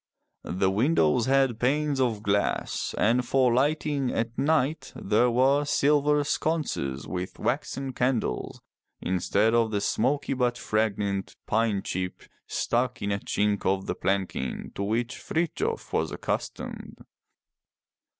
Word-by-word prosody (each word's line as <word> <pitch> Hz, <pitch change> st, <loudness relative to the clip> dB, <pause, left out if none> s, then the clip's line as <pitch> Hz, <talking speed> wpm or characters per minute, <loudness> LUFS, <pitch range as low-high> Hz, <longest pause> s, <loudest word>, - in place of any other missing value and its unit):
The 95 Hz, +1 st, 0 dB
windows 115 Hz, -, +2 dB
had 135 Hz, -4 st, +3 dB
panes 140 Hz, +2 st, +1 dB
of 115 Hz, -5 st, 0 dB
glass, 100 Hz, -1 st, 0 dB
and 120 Hz, +4 st, +3 dB
for 125 Hz, -1 st, +3 dB
lighting 140 Hz, 0 st, +1 dB
at 115 Hz, 0 st, -2 dB
night 155 Hz, +1 st, +1 dB
there 110 Hz, +5 st, +2 dB
were 135 Hz, +4 st, +3 dB
silver 145 Hz, 0 st, +3 dB
sconces 145 Hz, -, -1 dB
with 90 Hz, 0 st, -5 dB
waxen 135 Hz, -1 st, -2 dB
candles 125 Hz, -, -1 dB, 0.4 s
instead 100 Hz, +4 st, +1 dB
of 115 Hz, -1 st, +3 dB
the 105 Hz, -2 st, 0 dB
smoky 135 Hz, +8 st, 0 dB
but 125 Hz, -2 st, 0 dB
fragrant 100 Hz, -3 st, -1 dB
pine 110 Hz, -3 st, +1 dB
chip 90 Hz, 0 st, -4 dB, 0.2 s
stuck 125 Hz, 0 st, -1 dB
in 100 Hz, -, -1 dB
a 100 Hz, -, 0 dB
chink 105 Hz, 0 st, 0 dB
of 95 Hz, 0 st, +1 dB
the -, -, -1 dB
planking 95 Hz, -9 st, -2 dB
to -, -, -5 dB
which 115 Hz, +4 st, -1 dB
Frithjof 400 Hz, -, -2 dB
was -, -, 0 dB
accustomed. -, -, -4 dB
120 Hz, 125 wpm, -27 LUFS, 100-135 Hz, 0.4 s, had